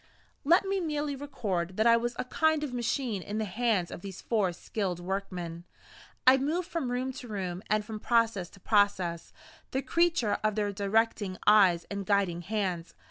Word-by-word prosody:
Let 345 +7 +4
me 390 0 0
merely 300 -4 -2
record 195 -11 -3
that 220 - +2
I 230 0 +7
was 240 +1 -1
a - - -2
kind 315 +3 +1
of 275 -4 -4
machine 240 -3 -1
in 205 +4 -5
the 220 - 0
hands 210 -3 0
of - - -7
these 195 -1 -8
four 210 -6 0
skilled 180 0 -3
workmen. 175 -2 -4 0.6
I 260 +1 +8
moved 320 +6 -1
from 330 -8 -2
room 255 +1 -2
to 250 - -9
room, 185 -4 -4
and 215 0 +1
from 215 0 -6
process 225 -6 +1
to 200 - -17
process, 190 -5 +1 0.4
the 265 +1 -2
creature 330 -6 +2
of 215 -1 +1
their 205 -1 0
directing 205 -1 0
eyes 195 -5 +5
and 200 0 -3
guiding 195 -4 +1
hands. 185 -3 -3
215 Hz, 180 wpm, -29 LUFS, 190-255 Hz, 0.6 s, I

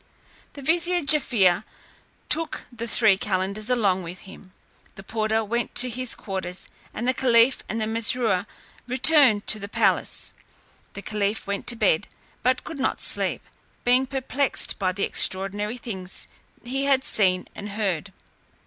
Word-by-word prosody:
The 280 - -10
vizier 345 +3 +1
Jaaffier 225 - +2 0.6
took 325 -1 +1
the 235 0 -5
three 215 -4 +4
calenders 200 +3 -2
along 200 -7 +1
with 175 +1 -8
him; 190 0 -14 0.4
the 195 - -11
porter 220 +1 -1
went 235 +3 -3
to 250 0 +5
his 255 +1 -3
quarters, 190 -2 -6 0.3
and 240 - -4
the 255 - +3
caliph 250 -2 +3
and 220 - -3 0.2
Mesrour 225 -3 0 0.4
returned 255 -4 +5
to 215 - +5
the 200 0 -7
palace. - - 0 0.6
The 200 - -9
caliph 210 +1 -2
went 200 0 -4
to 240 - +4
bed, 210 -3 +1 0.3
but 255 +1 +1
could 325 -4 -7
not 265 - -1
sleep, - - -1 0.4
being 250 +2 +3
perplexed 270 +1 -1
by 185 -2 +1
the 195 +2 -4
extraordinary 205 +4 +2
things 190 -6 -5 0.4
he 270 +3 -2
had 270 -1 +3
seen 185 -6 +1
and 205 - -8
heard. 195 -4 -3
220 Hz, 145 wpm, -24 LUFS, 195-255 Hz, 0.6 s, to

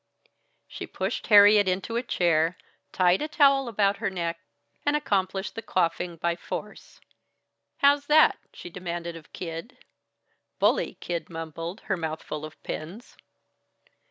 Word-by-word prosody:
She - - -7
pushed - - -3
Harriet 205 -1 +7
into 190 +5 -1
a 235 - +1
chair, 170 -7 +1 0.3
tied 180 0 +3
a 300 - -1
towel 275 -3 +4
about 200 -3 +1
her - - -1
neck, 170 -3 -3 0.4
and 290 0 +2
accomplished 195 -9 -1
the 225 - -6
coifing 170 -3 -1
by 170 +1 0
force. 210 +4 -8 0.8
"How's 285 0 +3
that?" 310 +1 +5
she 175 - -10
demanded 170 -1 -5
of 165 -1 -13
Kid. 165 +7 -7 0.8
"Bully!" - - +2
Kid 170 -1 -4
mumbled, 165 +3 -6
her 190 - -2
mouth 160 -1 -4
full 150 0 -5
of 155 - -11
pins. 180 +10 -7
185 Hz, 135 wpm, -26 LUFS, 170-220 Hz, 0.8 s, Harriet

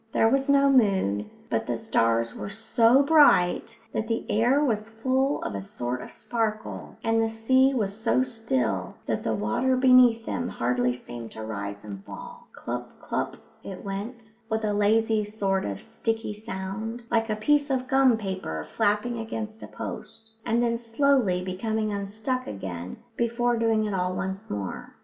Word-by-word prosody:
There 225 - +4
was 270 +3 +1
no 280 0 +5
moon, 190 - +3 0.2
but 115 -1 -1
the 120 - -1
stars 115 0 +1
were - - -6
so 230 +5 +4
bright 280 - +4 0.2
that 220 - -1
the 225 0 -1
air 245 +7 +3
was 215 -4 -1
full 260 +5 0
of - - -3
a 100 - -3
sort 120 +5 -4
of - - -9
sparkle; 220 -2 -3
and 225 0 +2
the 225 - +1
sea 260 +5 +3
was 200 -4 0
so 225 +3 +2
still 130 - -1
that - - -1
the 110 - 0
water 110 - +1
beneath 250 -3 +6
them 245 - -2
hardly 125 +1 0
seemed 120 -2 -7
to 110 - -7
rise 100 -2 -5
and 100 -2 -8
fall. - - -10
Clup, - - -5
clup - - -3 0.3
it 190 0 -8
went, 220 +4 -6 0.2
with 220 -1 0
a 210 - 0
lazy 215 +1 +3
sort 200 -2 -1
of 100 -1 -4
sticky 225 -1 -3
sound, 215 +2 -5
like 225 -1 +2
a 215 - +1
piece 285 +7 +2
of 255 -1 0
gum 265 -3 +4
paper 190 - -4
flapping 210 +3 0
against 220 -1 -5
a - - -7
post, 225 0 -8 0.2
and 235 +1 +2
then 235 -1 +1
slowly 230 -6 +2
becoming 215 +3 -2
unstuck 215 +6 -2
again 90 -3 -6 0.2
before 235 +1 +1
doing 225 -1 +2
it 210 - -2
all 180 -1 -1
once 190 +2 -4
more. 100 -2 -5
220 Hz, 170 wpm, -26 LUFS, 180-235 Hz, 0.3 s, beneath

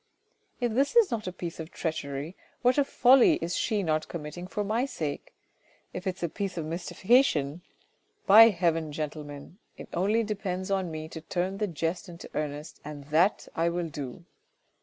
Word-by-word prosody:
" - - -46 0.2
If 240 -2 0
this 275 - +1
is 465 -4 +6
not 220 -4 -2
a - - -2
piece 175 -2 -6
of 160 0 -6
treachery, 155 -1 -4 0.3
what 250 +3 +4
a - - +5
folly 260 -1 +5
is 170 +1 -3
she 210 -2 0
not 155 -2 0
committing 170 +2 -6
for 210 +2 -2
my 220 +4 0
sake. 160 - -4 0.6
If 180 +1 -5
it's 185 0 -3
a - - +2
piece 195 +2 -4
of 165 - -2
mystification, 170 - +2 0.6
by 225 +3 +9
heaven, 165 -5 0
gentlemen, 150 +2 -6 0.2
it - - -10
only 205 +6 +2
depends 195 -3 -3
on 190 -2 0
me 155 -1 -5
to 160 - -8
turn 185 +4 -2
the 210 - +1
jest 170 +3 -3
into 170 0 -10
earnest 150 0 -4
and 145 -1 -8
that 175 +7 +3
I 165 +1 +2
will 170 -1 -2
do. 140 +1 -7
175 Hz, 180 wpm, -28 LUFS, 155-205 Hz, 0.6 s, by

